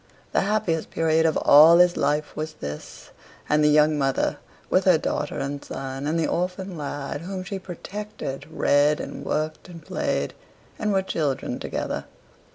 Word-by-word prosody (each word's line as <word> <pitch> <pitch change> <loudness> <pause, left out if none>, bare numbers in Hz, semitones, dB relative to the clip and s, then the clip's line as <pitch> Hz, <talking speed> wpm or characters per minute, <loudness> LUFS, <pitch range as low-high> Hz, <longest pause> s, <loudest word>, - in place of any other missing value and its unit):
The - - +2
happiest 195 -6 0
period 160 0 +2
of 160 - +1
all 155 +4 +8
his 180 0 +5
life 150 +1 0
was 155 +1 -4
this; 75 - -8 0.4
and 150 0 +3
the - - +5
young 150 0 +4
mother, 135 -1 0 0.3
with - - +2
her - - +6
daughter - - -2
and 140 +1 -4
son, 135 +1 -5
and 160 +2 0
the 160 - +1
orphan 180 +2 -2
lad 145 -1 -5
whom 185 +1 -5
she 195 +1 -5
protected, 195 -4 -7
read 150 -1 +3
and - - -6
worked 155 +3 -3
and 165 -3 -11
played, - - -1 0.5
and 215 -2 0
were 190 -1 +2
children 145 -7 -2
together. - - -3
155 Hz, 165 wpm, -24 LUFS, 145-180 Hz, 0.5 s, all